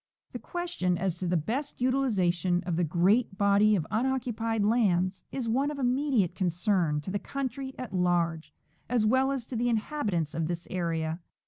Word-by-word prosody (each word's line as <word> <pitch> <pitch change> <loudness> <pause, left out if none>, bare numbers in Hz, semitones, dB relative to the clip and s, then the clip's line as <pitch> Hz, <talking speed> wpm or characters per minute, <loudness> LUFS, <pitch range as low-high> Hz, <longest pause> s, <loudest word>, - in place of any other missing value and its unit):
The - - -4
question 345 - -2
as 180 -2 -2
to 185 - -2
the 175 0 +2
best 250 - -3
utilization 190 -9 +1
of 175 -2 -1
the 175 - +1
great 190 +6 +2
body 200 +1 +4
of 165 -6 -1
unoccupied 230 -3 0
lands 190 -5 +2
is 255 -4 -3
one 265 +6 +1
of 295 - -5
immediate 255 - +1
concern 175 -4 0
to 170 - -6
the 205 - -1
country 265 +3 -4
at 255 - -6
large, 175 -3 0 0.4
as 240 -3 +2
well 260 +4 +3
as 265 -4 -3
to 255 - -7
the 240 +1 +1
inhabitants 215 - -1
of 165 -1 -1
this 170 0 -4
area. 165 -2 -2
205 Hz, 175 wpm, -28 LUFS, 175-250 Hz, 0.4 s, body